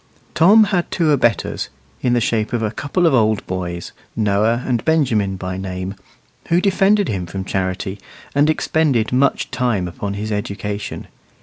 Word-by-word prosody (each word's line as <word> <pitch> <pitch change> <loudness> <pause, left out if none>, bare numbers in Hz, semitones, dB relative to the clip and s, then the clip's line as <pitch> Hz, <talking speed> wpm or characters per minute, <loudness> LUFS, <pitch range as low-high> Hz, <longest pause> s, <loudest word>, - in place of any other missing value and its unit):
Tom 200 +7 +6
had 195 -4 0
two 165 -4 +1
abettors, 120 -6 +1 0.3
in 125 - +1
the 120 - +3
shape 110 -1 0
of 115 -2 0
a 110 - 0
couple 150 +9 -1
of 165 - +4
old 110 -4 +2
boys, 90 -2 -4 0.2
Noah 110 +3 +1
and 120 -3 0
Benjamin 120 -12 +1
by 95 0 -5
name, 95 0 -4 0.5
who 170 - +3
defended 195 +1 +3
him 95 -4 -3
from 95 +2 -5
Charity, 95 +1 -2 0.3
and 145 +2 +3
expended 150 -7 +1
much 135 +2 +1
time 120 -8 0
upon 100 +3 -5
his 105 +2 -4
education. 105 0 -4
110 Hz, 160 wpm, -19 LUFS, 100-145 Hz, 0.5 s, Tom